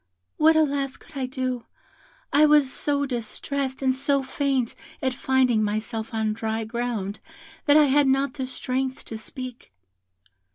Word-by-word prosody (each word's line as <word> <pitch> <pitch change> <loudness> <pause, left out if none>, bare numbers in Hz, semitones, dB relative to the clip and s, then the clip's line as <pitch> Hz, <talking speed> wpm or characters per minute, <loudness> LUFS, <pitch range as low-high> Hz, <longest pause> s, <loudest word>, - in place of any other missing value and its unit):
"What, 315 +1 +5
alas, 280 -3 +1
could 320 - -19
I 265 -2 -2
do? 255 -2 -3 0.7
I 300 +2 +6
was 295 -3 +4
so 285 -1 0
distressed 265 +2 -3
and 260 -1 +3
so 275 +1 +1
faint 265 -3 0 0.3
at 260 -1 0
finding 255 -3 +2
myself 220 +3 -2
on 220 -1 0
dry 220 0 -2
ground, 220 -3 -3 0.5
that 290 +1 +7
I 305 - +7
had 285 +1 +4
not 270 0 +2
the 265 -2 -4
strength 260 0 -2
to 225 - -6
speak. 250 - -8
260 Hz, 150 wpm, -25 LUFS, 235-280 Hz, 0.7 s, that